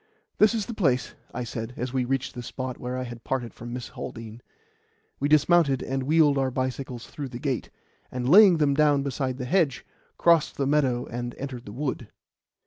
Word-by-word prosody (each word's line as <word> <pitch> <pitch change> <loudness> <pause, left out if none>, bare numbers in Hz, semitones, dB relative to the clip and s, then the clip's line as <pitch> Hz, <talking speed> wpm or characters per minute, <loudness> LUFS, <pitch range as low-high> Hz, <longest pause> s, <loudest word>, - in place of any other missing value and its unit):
"This 215 +2 +5
is 215 -3 -1
the 235 - -6
place," 135 - +1 0.2
I 125 - -4
said, 115 0 -6
as 125 +1 -3
we 130 -2 +1
reached 135 +1 -2
the 125 - -6
spot 130 +1 -5
where 125 +1 -4
I 130 - -2
had 120 -1 -8
parted 125 -3 -3
from 120 +1 -9
Miss 125 0 -5
Haldean. 115 +1 -8 0.8
We 145 - 0
dismounted 155 -2 +4
and 135 0 -2
wheeled 145 0 +3
our 135 -1 +1
bicycles 130 -2 -4
through 140 -3 -7
the 120 - -7
gate, 135 -2 -2 0.4
and 125 -1 -3
laying 190 +2 +8
them 145 -2 +3
down 145 -1 +3
beside 130 -2 -2
the 125 - -4
hedge, 155 -3 +1 0.3
crossed 170 -3 +3
the 140 - 0
meadow 135 -4 +1
and 120 +1 -5
entered 130 -3 -6
the - - -7
wood. 130 -1 -3
130 Hz, 195 wpm, -26 LUFS, 125-145 Hz, 0.8 s, laying